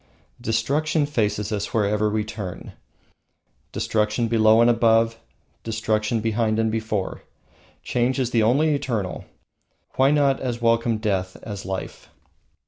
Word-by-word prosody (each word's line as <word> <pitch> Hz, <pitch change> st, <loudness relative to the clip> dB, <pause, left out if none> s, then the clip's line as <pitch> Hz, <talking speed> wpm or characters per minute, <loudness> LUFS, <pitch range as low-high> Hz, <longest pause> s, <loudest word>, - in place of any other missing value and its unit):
Destruction 145 Hz, +8 st, 0 dB
faces 105 Hz, -6 st, -1 dB
us 105 Hz, +1 st, -3 dB
wherever 105 Hz, 0 st, +1 dB
we 105 Hz, 0 st, -1 dB
turn. 105 Hz, -4 st, -7 dB, 1.0 s
Destruction 110 Hz, +2 st, 0 dB
below 110 Hz, -1 st, +4 dB
and 115 Hz, -, +5 dB
above, 115 Hz, -1 st, +3 dB, 0.4 s
destruction 110 Hz, 0 st, -1 dB
behind 110 Hz, 0 st, 0 dB
and 110 Hz, 0 st, +1 dB
before. 110 Hz, -3 st, -3 dB, 0.6 s
Change 125 Hz, +2 st, 0 dB
is 125 Hz, -2 st, -1 dB
the 115 Hz, -, +3 dB
only 140 Hz, +8 st, +3 dB
Eternal, 120 Hz, -10 st, -3 dB, 0.7 s
why 135 Hz, +1 st, +5 dB
not 140 Hz, -2 st, +2 dB
as 120 Hz, -2 st, -3 dB
welcome 115 Hz, -1 st, +2 dB
Death 95 Hz, -4 st, -2 dB
as 100 Hz, -3 st, -7 dB
Life? 95 Hz, 0 st, -6 dB
115 Hz, 125 wpm, -23 LUFS, 105-120 Hz, 1.0 s, and